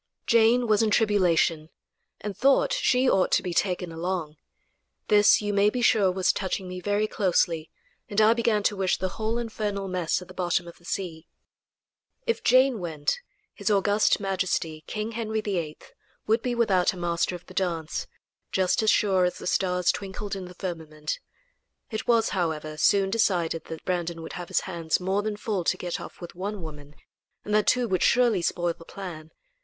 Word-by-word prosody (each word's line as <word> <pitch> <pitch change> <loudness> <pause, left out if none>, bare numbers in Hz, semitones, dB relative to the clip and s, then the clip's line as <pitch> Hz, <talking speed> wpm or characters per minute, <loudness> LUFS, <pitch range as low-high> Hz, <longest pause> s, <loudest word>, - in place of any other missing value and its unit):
Jane 230 +2 +4
was 215 -1 +3
in 220 - +2
tribulation, 180 -7 +2 0.5
and 205 -1 -5
thought 275 - +3
she 265 - +2
ought 190 -6 +3
to - - +3
be 180 - -3
taken 180 -2 0
along. 165 -2 -3 0.7
This, 210 0 +5
you 205 0 -1
may 200 +1 +4
be 245 +2 -2
sure, 200 -5 +4
was 185 0 +2
touching 190 -1 -3
me 180 0 -6
very 205 +2 +1
closely, 170 -6 0 0.4
and 205 -1 0
I 220 +1 +6
began 230 -3 +1
to 205 - +1
wish 190 -2 +1
the 185 - -2
whole 220 +4 -2
infernal 210 -4 -3
mess 180 -3 0
at 180 - -11
the 185 - -12
bottom 175 -1 -1
of 170 - -12
the 170 - -21
sea. 170 -4 -4 1.0
If 465 -1 -1
Jane 255 -1 +4
went, 160 - -2 0.3
his 205 +1 -2
august 205 +1 +3
majesty, 185 -5 -2
King 215 +1 -3
Henry 220 -1 -2
VIII, 175 -8 -3 0.5
would 225 +2 +2
be 245 0 -1
without 195 -7 +2
a - - -10
Master 175 0 -1
of 175 - -11
the - - -13
Dance, 170 -4 -2 0.4
just 185 +2 +2
as 220 - +3
sure 190 -4 +3
as 180 - -1
the - - -9
stars 180 -1 +2
twinkled 200 +1 -5
in 190 -1 -6
the 180 0 -11
firmament. 160 -5 -5 0.7
It 220 0 -4
was, 230 -2 +3
however, 155 -4 -2
soon 195 +4 +3
decided 175 -7 +1
that 160 -1 -8
Brandon 170 -2 -2
would - - -8
have 175 -1 -6
his - - +1
hands 170 -3 -1
more 190 +2 0
than 210 0 -3
full 205 -4 -2
to - - +1
get 175 -1 -4
off - - -10
with 175 - -9
one 195 +1 -5
woman, 150 -2 -10 0.5
and 210 - -3
that 215 0 +3
two 250 -1 +3
would 185 -4 0
surely 235 -6 +3
spoil 175 0 0
the 165 - -15
plan. 165 -4 -8
190 Hz, 185 wpm, -26 LUFS, 175-215 Hz, 1.0 s, I